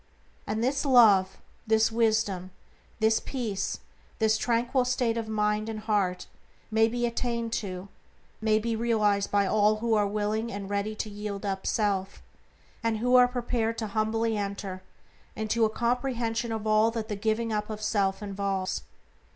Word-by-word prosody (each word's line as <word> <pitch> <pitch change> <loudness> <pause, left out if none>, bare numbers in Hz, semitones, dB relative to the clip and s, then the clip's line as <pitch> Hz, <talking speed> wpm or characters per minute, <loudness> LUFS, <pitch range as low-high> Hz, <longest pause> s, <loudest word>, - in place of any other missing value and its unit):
And 215 +2 -1
this 270 +3 +1
Love, 210 -8 +5 0.3
this 220 0 +3
Wisdom, 220 -5 +1 0.5
this 220 0 +3
Peace, 225 -7 -3 0.4
this 220 -1 +3
tranquil 245 +3 +1
state 250 -2 0
of 230 -1 -3
mind 210 0 0
and 215 -1 -5
heart 205 -4 0 0.5
may 225 0 +4
be 240 +1 -1
attained 235 -1 -2
to, 185 -2 -6 0.5
may 215 -1 +3
be 225 +1 -1
realized 215 -3 +1
by 200 -1 +2
all 210 +2 +3
who 230 +1 -1
are 210 -2 +3
willing 215 +2 -1
and 200 -1 -6
ready 205 +2 -1
to 215 - -4
yield 205 0 -5
up 195 -1 -3
self, 200 -3 -1 0.6
and 230 -1 0
who 250 +3 +2
are 250 0 +8
prepared 235 -2 -1
to 225 - -2
humbly 225 +1 0
enter 200 -2 -4 0.5
into 220 +1 +1
a - - +1
comprehension 235 0 -1
of 220 -1 -3
all 215 +1 +4
that 225 -1 -4
the 210 - -3
giving 220 +2 -1
up 210 0 -2
of 215 -1 -5
self 200 -2 0
involves. 195 -2 -2
220 Hz, 160 wpm, -28 LUFS, 205-230 Hz, 0.6 s, are